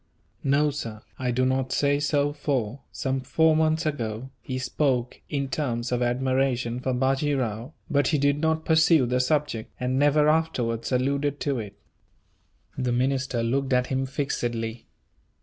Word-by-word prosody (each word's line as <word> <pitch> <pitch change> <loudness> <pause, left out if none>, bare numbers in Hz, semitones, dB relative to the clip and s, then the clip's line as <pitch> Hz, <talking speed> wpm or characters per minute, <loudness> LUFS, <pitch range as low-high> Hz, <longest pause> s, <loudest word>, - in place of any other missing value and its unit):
"No, 145 +2 +3
sir, 115 -7 -6 0.2
I 130 -1 -1
do 125 +1 +1
not 130 0 0
say 145 0 +2
so 145 -1 +1
for, 135 -5 -2
some 135 0 -2
four 155 +5 +3
months 160 +1 +2
ago, 125 -4 -3
he 130 - -4
spoke 130 -2 -1
in 140 -2 -1
terms 125 -4 -2
of 125 0 0
admiration 125 -1 0
for 130 +1 -1
Bajee 135 +3 +1
Rao; 120 +2 -3
but 145 -3 +2
he 155 - +2
did 145 +1 +2
not 160 0 0
pursue 160 -3 +5
the 125 +1 0
subject, 130 -4 0
and 125 +1 0
never 145 +1 +4
afterwards 130 -8 0
alluded 140 +3 0
to 140 -4 0
it." 105 -2 -7 1.0
The 125 -2 -1
minister 130 -1 0
looked 135 +3 0
at 125 0 +3
him 135 0 0
fixedly. 120 -5 -3
130 Hz, 155 wpm, -26 LUFS, 125-145 Hz, 1.0 s, pursue